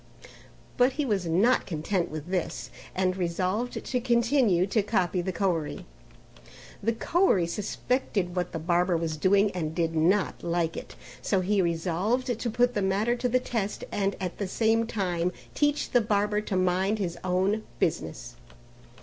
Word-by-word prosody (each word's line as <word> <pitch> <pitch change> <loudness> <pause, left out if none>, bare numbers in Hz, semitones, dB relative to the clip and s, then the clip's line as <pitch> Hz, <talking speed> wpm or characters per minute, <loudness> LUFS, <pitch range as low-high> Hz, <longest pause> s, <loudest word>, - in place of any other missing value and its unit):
But 250 +1 +4
he 295 +1 -1
was 200 -7 0
not 200 +10 +3
content 175 +2 -1
with 155 +2 -7
this 175 -3 -2 0.2
and 185 0 +1
resolved 185 +6 -2
to 250 -2 -1
continue 235 -6 +3
to 210 +3 +1
copy 185 -3 0
the 190 +2 -2
Koeri; 175 -4 -1 1.0
the 230 +3 +1
Koeri 270 - +2
suspected 195 0 -2
what 180 -1 -1
the - - -3
barber 175 +2 +1
was 165 -1 -2
doing 200 +5 +3
and 160 -3 -3
did 165 -1 0
not 180 +5 +2
like 170 -1 -1
it. - - -8 0.3
So 190 +6 +1
he 195 +2 +2
resolved 185 +9 0
to 235 - -1
put 245 +2 +2
the 205 - 0
matter 200 +5 +1
to 245 +1 0
the 255 +2 +3
test 220 -5 -3
and 200 -1 0
at 180 -2 -4
the 200 - -1
same 225 +3 +2
time 180 -5 -1 0.2
teach 290 0 +1
the 245 - +4
barber 210 0 +1
to 210 - -3
mind 185 +3 +1
his 175 -4 -3
own 190 +4 +1 0.2
business. - - -2
190 Hz, 160 wpm, -27 LUFS, 175-225 Hz, 1.0 s, But